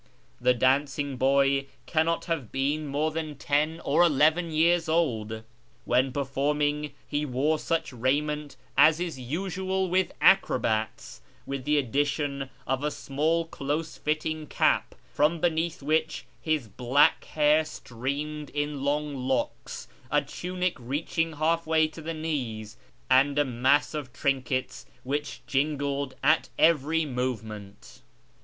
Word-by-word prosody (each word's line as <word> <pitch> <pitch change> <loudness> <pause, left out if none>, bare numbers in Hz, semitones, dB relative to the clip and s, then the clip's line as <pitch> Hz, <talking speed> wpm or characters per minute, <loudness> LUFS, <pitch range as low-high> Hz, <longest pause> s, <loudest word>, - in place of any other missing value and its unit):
The 125 - +3
dancing 140 +2 +1
boy 135 +1 +2 0.2
cannot 165 +1 +1
have 155 -10 -3
been 145 +3 -1
more 150 +3 0
than 155 -1 -4
ten 150 +4 0
or 145 +5 +2
eleven 160 +1 +4
years 165 +1 +2
old. 110 -10 0 0.4
When 130 +2 +2
performing, 145 +2 -1
he 145 +1 -1
wore 150 +3 0
such 165 -4 -1
raiment 145 +4 -1 0.2
as 155 +1 +6
is 170 -6 -3
usual 185 +6 -2
with 185 0 +2
acrobats, 110 - +2 0.2
with 135 -2 -5
the 150 0 +2
addition 140 +1 -1 0.2
of 135 +2 -1
a 150 - +1
small 155 +4 0
close 155 +1 -3
fitting 155 0 -2
cap, - - +1 0.2
from 155 +3 +2
beneath 165 -1 0
which 155 +1 0 0.2
his 155 -7 0
black 125 +7 +3
hair 150 +1 +3
streamed 145 +2 -5
in 145 -1 -3
long 145 +1 0
locks, 130 -1 -3 0.2
a - - +2
tunic 180 0 -3
reaching 155 +6 -2
half 160 +2 0
way 160 -1 +3
to 160 +1 -11
the 165 +1 -4
knees, 125 -10 -4 0.3
and 135 +2 +4
a 145 - +4
mass 130 +4 +2
of 145 -4 -5
trinkets 130 -1 -2 0.2
which 145 +3 -3
jingled 140 -1 -1
at 155 +3 +3
every 160 0 +3
movement. 110 -6 -5
145 Hz, 130 wpm, -27 LUFS, 135-160 Hz, 0.4 s, as